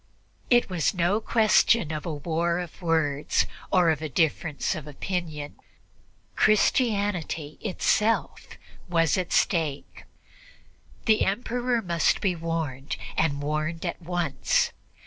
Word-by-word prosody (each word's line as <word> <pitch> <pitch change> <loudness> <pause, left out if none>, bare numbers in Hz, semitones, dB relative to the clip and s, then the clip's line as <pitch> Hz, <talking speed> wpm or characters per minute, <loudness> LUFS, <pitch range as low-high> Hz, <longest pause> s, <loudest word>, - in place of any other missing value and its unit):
It 240 -1 +4
was 180 0 0
no 180 +4 +2
question 220 -5 +3
of 155 +1 -4
a 165 - -2
war 170 +3 -1
of 175 +1 -7
words 150 - +1 0.3
or 180 -3 +4
a 155 0 -3
difference 155 +2 0
of 155 -4 -7
opinion 150 -1 -4 0.8
Christianity 205 - +1
itself 215 +2 0 0.3
was 165 -3 +2
at 185 -2 -2
stake; 155 -6 0 1.0
the 220 -2 +4
Emperor 240 +3 -1
must 170 -3 +1
be 185 -3 0
warned, 160 -5 -3 0.2
and 145 -3 0
warned 155 +3 -2
at 175 - -4
once. 170 -4 0
170 Hz, 110 wpm, -26 LUFS, 155-195 Hz, 1.0 s, It